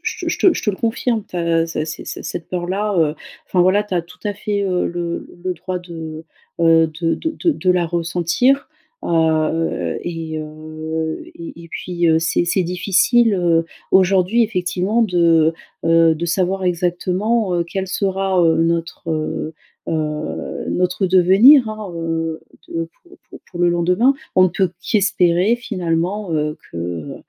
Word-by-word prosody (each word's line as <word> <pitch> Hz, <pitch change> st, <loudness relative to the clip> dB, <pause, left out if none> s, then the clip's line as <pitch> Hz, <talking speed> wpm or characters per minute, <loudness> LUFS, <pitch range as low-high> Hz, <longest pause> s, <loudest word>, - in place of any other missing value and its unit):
je -, -, -3 dB
te -, -, +1 dB
je -, -, -3 dB
te 365 Hz, -, +5 dB
je -, -, -4 dB
te 210 Hz, -, +2 dB
le 195 Hz, -, -6 dB
confirme 230 Hz, -1 st, -1 dB
tu 180 Hz, -, -8 dB
as 165 Hz, -1 st, +1 dB
ça 155 Hz, -2 st, -3 dB
c 155 Hz, -, -6 dB
ces -, -, -6 dB
cette 165 Hz, -, -6 dB
peur-là 190 Hz, +4 st, -2 dB
heu, 155 Hz, -1 st, +2 dB, 0.3 s
enfin 180 Hz, -1 st, +2 dB
voilà 190 Hz, +3 st, +3 dB
tu 210 Hz, -3 st, -5 dB
as 175 Hz, -, +1 dB
tout 180 Hz, +1 st, -17 dB
à 205 Hz, -1 st, -1 dB
fait 205 Hz, 0 st, -2 dB
heu 185 Hz, -2 st, 0 dB
le 170 Hz, -1 st, -3 dB
le 175 Hz, -, -15 dB
le 185 Hz, -1 st, -2 dB
droit 180 Hz, +2 st, -4 dB
de 160 Hz, -2 st, -8 dB, 0.4 s
heu 165 Hz, -1 st, +5 dB
de 165 Hz, -1 st, +1 dB
de 325 Hz, +1 st, -1 dB
de 185 Hz, -, 0 dB
la 180 Hz, -2 st, +2 dB
ressentir. 175 Hz, -, +1 dB, 0.4 s
Heu 160 Hz, 0 st, 0 dB
et 165 Hz, -2 st, -4 dB
heu 155 Hz, +1 st, -5 dB
et -, -, -15 dB, 0.3 s
et -, -, -11 dB
et -, -, -13 dB
puis 175 Hz, -1 st, -1 dB
heu, 160 Hz, 0 st, +4 dB
c'est 165 Hz, +1 st, +1 dB
c'est 180 Hz, +1 st, +1 dB
difficile, 200 Hz, +6 st, +3 dB
heu, 170 Hz, -2 st, +2 dB, 0.3 s
aujourd'hui 190 Hz, +4 st, +4 dB
effectivement 195 Hz, +1 st, 0 dB
de 165 Hz, -4 st, +3 dB, 0.3 s
heu 165 Hz, -1 st, +5 dB
de 170 Hz, -, -3 dB
savoir 185 Hz, +2 st, 0 dB
exactement 180 Hz, +4 st, 0 dB
heu, 170 Hz, -1 st, +1 dB
quel 190 Hz, +2 st, -4 dB
sera, 190 Hz, 0 st, 0 dB
heu, 165 Hz, -1 st, +4 dB
notre, 165 Hz, +1 st, -1 dB
heu 155 Hz, 0 st, -3 dB, 0.3 s
heu 155 Hz, -1 st, -3 dB
notre 180 Hz, +2 st, 0 dB
heu, -, -, +1 dB
devenir 200 Hz, +8 st, +6 dB
hein, 215 Hz, -4 st, -6 dB
heu, 165 Hz, -1 st, -3 dB, 0.3 s
de 165 Hz, 0 st, -4 dB, 0.2 s
pour 360 Hz, +2 st, -18 dB
pour -, -, -11 dB
pour 175 Hz, -1 st, -6 dB
le 175 Hz, -, +4 dB
lendemain. 180 Hz, +10 st, +2 dB, 0.2 s
On 185 Hz, -, +6 dB
ne 185 Hz, -, +5 dB
peut 185 Hz, 0 st, 0 dB
qu'espérer 185 Hz, 0 st, +2 dB
finalement 185 Hz, -3 st, -2 dB
heu, 150 Hz, 0 st, -1 dB
que -, -, -7 dB
heu, 85 Hz, -1 st, -5 dB
175 Hz, 175 wpm, -19 LUFS, 165-195 Hz, 0.4 s, devenir